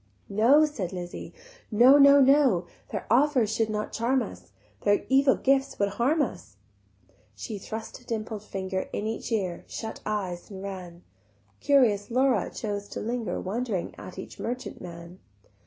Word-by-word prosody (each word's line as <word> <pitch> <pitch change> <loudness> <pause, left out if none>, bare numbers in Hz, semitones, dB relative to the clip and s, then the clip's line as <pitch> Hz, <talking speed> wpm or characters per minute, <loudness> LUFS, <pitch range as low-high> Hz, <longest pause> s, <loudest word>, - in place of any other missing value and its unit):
"No," 245 +10 +5
said 220 - -4
Lizzie, 175 -2 -7 0.4
"No, 250 +6 +7
no, 280 0 +8
no; 265 -10 +4 0.2
Their - - -4
offers 250 -4 +3
should 225 0 0
not 210 0 -3
charm 250 +3 +1
us, - - -10 0.3
Their 205 0 +2
evil 270 0 +5
gifts 270 0 +1
would 200 0 +1
harm 275 +9 +1
us." - - -7 0.8
She 215 -4 -6
thrust 220 +3 -7
a - - -20
dimpled 220 -2 -4
finger 190 -2 -4
In 205 - -2
each 225 +2 -4
ear, 190 -6 -1
shut 220 -1 -6
eyes 190 -5 -3
and 195 -2 -8
ran: 180 -3 -8 0.6
Curious 230 -8 +3
Laura 250 -4 +2
chose 205 -2 -4
to - - -6
linger 230 -4 -3
Wondering 210 -1 -3
at 185 - -10
each 190 - -9
merchant 250 +2 -5
man. 170 +1 -10
220 Hz, 155 wpm, -27 LUFS, 195-255 Hz, 0.8 s, no